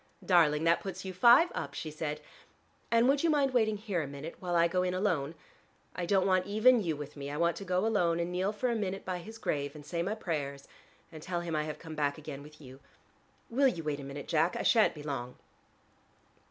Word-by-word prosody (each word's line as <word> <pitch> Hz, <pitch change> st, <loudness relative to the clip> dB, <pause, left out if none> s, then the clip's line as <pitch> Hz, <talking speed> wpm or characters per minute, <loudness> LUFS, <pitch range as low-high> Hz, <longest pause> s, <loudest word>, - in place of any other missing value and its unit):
"Darling, 160 Hz, -4 st, +4 dB
that 165 Hz, +1 st, +4 dB
puts 190 Hz, -1 st, -6 dB
you 190 Hz, -, -5 dB
five 240 Hz, -, +6 dB
up," 140 Hz, +1 st, -5 dB
she 155 Hz, -, -5 dB
said, 150 Hz, -1 st, -4 dB, 0.7 s
"and 230 Hz, +1 st, +4 dB
would 275 Hz, +1 st, +3 dB
you 335 Hz, -, +2 dB
mind 280 Hz, -4 st, +2 dB
waiting 220 Hz, -3 st, +2 dB
here 200 Hz, -5 st, -2 dB
a 150 Hz, -, -4 dB
minute, 140 Hz, +4 st, -7 dB
while 175 Hz, -1 st, -2 dB
I 170 Hz, 0 st, +5 dB
go 180 Hz, +2 st, 0 dB
in 180 Hz, 0 st, -1 dB
alone? 170 Hz, -6 st, 0 dB, 0.6 s
I 175 Hz, -1 st, -3 dB
don't 190 Hz, 0 st, +3 dB
want 185 Hz, -1 st, +2 dB
even 220 Hz, +4 st, +5 dB
you 165 Hz, -5 st, -1 dB
with 145 Hz, 0 st, -8 dB
me: 140 Hz, -1 st, -6 dB
I 145 Hz, -, -4 dB
want 170 Hz, +1 st, +2 dB
to -, -, -6 dB
go 185 Hz, +2 st, +1 dB
alone 175 Hz, -7 st, +2 dB
and 170 Hz, +1 st, -2 dB
kneel 185 Hz, +3 st, 0 dB
for 240 Hz, +4 st, -1 dB
a -, -, 0 dB
minute 195 Hz, -3 st, -3 dB
by 185 Hz, -1 st, -3 dB
his 220 Hz, +6 st, -10 dB
grave, 145 Hz, -8 st, -2 dB
and 150 Hz, -1 st, -11 dB
say 170 Hz, +2 st, -2 dB
my 200 Hz, +5 st, -1 dB
prayers, 145 Hz, -9 st, -4 dB, 0.4 s
and 160 Hz, -2 st, -10 dB
tell 175 Hz, +1 st, -3 dB
him 170 Hz, -2 st, -3 dB
I 150 Hz, 0 st, 0 dB
have 155 Hz, -, -5 dB
come 160 Hz, -1 st, -9 dB
back 145 Hz, -1 st, -1 dB
again 145 Hz, -2 st, -8 dB
with 150 Hz, +1 st, -14 dB
you. 130 Hz, -2 st, -13 dB, 0.7 s
Will 270 Hz, +4 st, +4 dB
you 170 Hz, -10 st, -2 dB
wait 150 Hz, -2 st, -2 dB
for -, -, -6 dB
a -, -, -8 dB
minute, 140 Hz, 0 st, -7 dB
Jack? 165 Hz, +2 st, +2 dB
I -, -, -2 dB
shan't 225 Hz, -6 st, +4 dB
be 150 Hz, -, -9 dB
long." 125 Hz, -4 st, -4 dB
170 Hz, 240 wpm, -31 LUFS, 150-200 Hz, 0.7 s, five